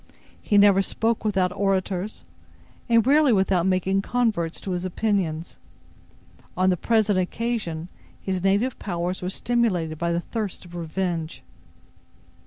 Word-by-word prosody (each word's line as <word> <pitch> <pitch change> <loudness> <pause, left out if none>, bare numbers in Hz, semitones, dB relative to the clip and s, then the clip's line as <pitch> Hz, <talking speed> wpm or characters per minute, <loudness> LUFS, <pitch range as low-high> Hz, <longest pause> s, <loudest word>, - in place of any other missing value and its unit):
He 205 - +2
never 200 -1 +6
spoke 225 +3 -1
without 190 -4 +1
auditors, 195 0 -1 0.6
and 230 -1 +4
rarely 290 0 +5
without 190 -3 +2
making 190 +1 +1
converts 210 -8 -1
to 195 - -4
his 180 0 -2
opinions. 185 -4 -2 1.0
On 185 +1 +3
the - - +2
present 210 0 +2
occasion, 185 -4 -2 0.3
his 185 -2 -3
native 205 +6 +1
powers 175 -1 -3
were 180 - -2
stimulated 190 -9 0
by 170 0 0
the 170 - +1
thirst 210 0 -5
of 175 - -14
revenge. 170 -1 -3
190 Hz, 130 wpm, -24 LUFS, 175-215 Hz, 1.0 s, never